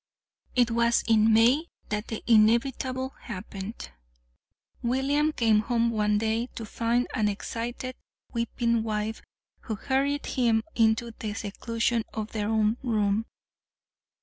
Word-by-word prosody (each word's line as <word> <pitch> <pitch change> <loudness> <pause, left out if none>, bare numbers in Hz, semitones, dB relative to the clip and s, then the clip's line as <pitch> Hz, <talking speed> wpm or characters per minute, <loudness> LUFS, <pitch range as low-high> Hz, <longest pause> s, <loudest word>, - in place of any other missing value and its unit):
It 245 -2 +3
was 235 0 +3
in 225 -1 +5
May 245 +9 +4 0.2
that 210 +1 -2
the 225 - -5
inevitable 245 +4 +3 0.2
happened. 205 - -7 0.9
William 275 +5 +1
came 225 -6 +3
home 235 +1 +1
one 210 -1 +2
day 225 +2 0
to 225 - -5
find 235 +3 0
an 215 -3 +1
excited, 235 +5 -4 0.4
weeping 235 0 0
wife 215 0 -2 0.4
who 220 - -4
hurried 275 +5 0
him 230 -3 +2
into 230 +1 +2
the 215 -1 -4
seclusion 230 +2 -1
of 215 -1 -4
their 210 -1 -2
own 220 0 +2
room. 215 -3 0
230 Hz, 120 wpm, -27 LUFS, 215-240 Hz, 0.9 s, in